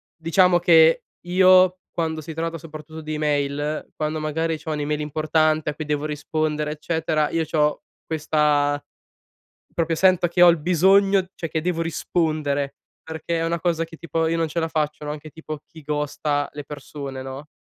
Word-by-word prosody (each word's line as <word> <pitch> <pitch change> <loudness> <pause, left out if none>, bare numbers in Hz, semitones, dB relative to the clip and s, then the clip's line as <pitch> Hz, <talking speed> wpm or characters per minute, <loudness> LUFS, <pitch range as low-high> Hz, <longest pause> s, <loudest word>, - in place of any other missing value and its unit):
diciamo 175 +2 +3
che 165 -1 +5 0.2
io 185 0 +5
quando 160 -2 -2
si 160 +2 -7
tratta 165 +1 -3
soprattutto 155 0 -10
di 155 0 -5
email, 145 0 -1
quando 155 0 -2
magari 160 +1 -1
c'ho 160 -1 -5
un'email 150 0 -2
importante 155 +1 +1
a - - -12
cui 155 0 -5
devo 150 0 -1
rispondere 150 0 -2
eccetera, 155 -1 -1
io 165 -1 0
c'ho 150 - 0 0.2
questa 150 -2 +1 0.9
proprio 165 -1 0
sento 185 0 +4
che 175 +1 -1
ho 175 - +10
il 170 - +2
bisogno 190 +4 +4
cioè 165 - -5
che 160 0 -1
devo 170 -1 -1
rispondere, 155 -4 -1 0.3
perché 165 +1 -3
è 165 - 0
una 170 +1 0
cosa 165 -2 0
che 165 0 -12
tipo 165 0 -1
io 165 - 0
non 165 0 +1
ce 170 +2 -2
la 160 - -1
faccio, 150 -2 -2
no, 150 - -4
anche 155 +1 -9
tipo 155 -1 -7
chi 160 - -14
ghosta 145 0 -1
le 145 - -6
persone, 140 -2 -7
no. 135 +3 -8
155 Hz, 175 wpm, -23 LUFS, 150-165 Hz, 0.9 s, ho